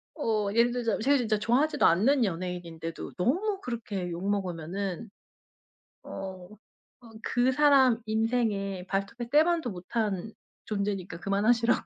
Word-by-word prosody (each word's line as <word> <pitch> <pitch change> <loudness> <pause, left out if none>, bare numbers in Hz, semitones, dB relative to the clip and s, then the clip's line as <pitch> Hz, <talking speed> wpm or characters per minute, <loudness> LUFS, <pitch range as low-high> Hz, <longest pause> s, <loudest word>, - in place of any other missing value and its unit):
어 215 -8 0
예를 235 +1 +4
들자면 235 -4 -1
제가 280 +4 +4
진짜 220 -4 +1
좋아하지도 285 +8 +2
않는 240 +10 +4
연예인인데도 170 -2 -5
너무 380 - 0
그렇게 210 -7 -4
욕먹으면은 190 +2 -3 0.9
어 190 -1 -7 0.5
어 235 - -14
그 250 +1 +1
사람 265 -4 +5
인생에 215 -4 -1
발톱의 205 +5 -3
때만도 315 -2 +3
못한 195 +2 -3 0.3
존재니까 200 -5 -3
그만하시라고. 225 +5 +2
215 Hz, 300 characters per minute, -28 LUFS, 190-245 Hz, 0.9 s, 사람